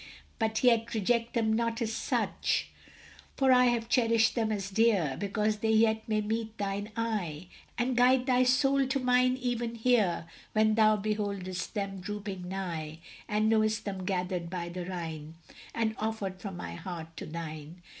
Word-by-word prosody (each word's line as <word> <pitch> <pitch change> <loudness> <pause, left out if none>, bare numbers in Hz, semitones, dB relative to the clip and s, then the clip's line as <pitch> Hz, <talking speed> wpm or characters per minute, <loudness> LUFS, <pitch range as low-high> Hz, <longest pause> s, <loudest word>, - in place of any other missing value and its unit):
But 220 0 0
yet 235 -2 +3
reject 230 +3 0
them 220 -2 +2
not 230 0 0
as 225 -2 -1
such; - - -1 0.7
For 265 -1 +4
I 250 0 +6
have 240 -2 +1
cherished 230 -3 +3
them 225 -2 0
as 200 -2 -3
dear. 195 - +2
Because 210 +1 0
they 220 +1 -1
yet 220 0 +4
may 215 -1 +2
meet 220 +1 -3
thine 200 +1 -3
eye, 185 -8 -2 0.3
And 245 +1 0
guide 250 +1 +4
thy 255 -1 +3
soul 270 +1 +3
to 270 +1 0
mine 250 0 +3
even 240 -2 -2
here, 225 -8 +2 0.3
When 215 0 +4
thou 215 -1 +5
beholdest 200 -3 -3
them 195 -2 -3
drooping 195 -2 -5
nigh, 165 -5 -4 0.3
And 210 +1 +1
knowest 215 -1 +2
them 190 -2 -4
gathered 180 -2 -2
by 175 -1 -4
the 175 0 -6
Rhine, 160 -4 -6 0.4
And 225 -1 +1
offered 210 -4 -3
from 195 -4 -6
my 85 - -6
heart 165 - -7
to - - -6
thine! 160 +1 -7
215 Hz, 165 wpm, -30 LUFS, 185-230 Hz, 0.7 s, I